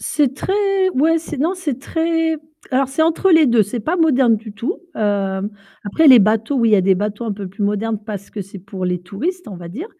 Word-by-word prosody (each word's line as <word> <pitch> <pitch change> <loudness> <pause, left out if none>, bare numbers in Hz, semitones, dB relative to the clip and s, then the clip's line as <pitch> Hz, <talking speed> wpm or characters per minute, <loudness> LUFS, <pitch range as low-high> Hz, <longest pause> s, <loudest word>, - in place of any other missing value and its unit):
C'est 280 -4 0
très 390 +2 +1
ouais, 320 +5 +3
c'est 315 -2 -7
non, 330 +6 +1
c'est 305 -9 -4
très 325 +2 -1 0.3
alors 265 0 +1
c'est 280 +4 0
entre 335 +4 +2
les 320 -3 +6
2, 235 -3 +4
c'est 210 +5 -4
pas 320 +11 -1
moderne 265 -9 +3
du 215 0 -10
tout. 230 +7 -4 0.2
Hem, 200 -1 -1 0.3
après 300 +10 +3
les 255 -3 +9
bateaux, 220 +6 +1
oui, 230 -3 +3
il - - +1
y - - +7
a - - +4
des 190 +1 +3
bateaux 205 +4 -3
un 220 - -2
peu 200 -1 -6
plus 200 +3 -7
modernes 210 +2 -1
parce 205 -3 -7
que 210 - -6
c'est 195 +1 -11
pour 190 0 -7
les 180 -1 -1
touristes, 330 - -4
on 200 - -8
va 175 -1 -9
dire. 280 - -6
230 Hz, 240 wpm, -19 LUFS, 205-320 Hz, 0.3 s, les